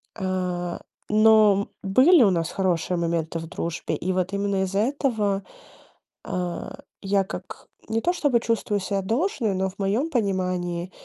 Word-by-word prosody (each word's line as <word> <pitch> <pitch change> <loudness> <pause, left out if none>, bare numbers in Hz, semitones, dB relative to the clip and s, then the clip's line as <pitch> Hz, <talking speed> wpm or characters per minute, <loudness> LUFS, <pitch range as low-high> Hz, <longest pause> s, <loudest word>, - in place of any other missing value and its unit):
А, 180 -3 -3 0.3
но 215 -2 +5
были 260 - +6
у 205 - +5
нас 165 -2 -1
хорошие 180 -2 0
моменты 165 -1 -1
в 165 - -7
дружбе, 170 0 -3
и 185 - -2
вот 185 +1 -1
именно 200 -1 0
из-за 195 +1 -1
этого, 220 -6 0 0.8
а, 180 +9 -4 0.2
я 195 0 +1
как 185 -1 -9 0.2
не 225 +1 0
то 350 - +2
чтобы 290 -8 +2
чувствую 225 -3 -1
ся 195 +1 -2
должной, 230 - 0
но 190 +1 0
в 190 - -17
моём 215 +11 0
понимании, 185 - -1
195 Hz, 145 wpm, -24 LUFS, 180-220 Hz, 0.8 s, были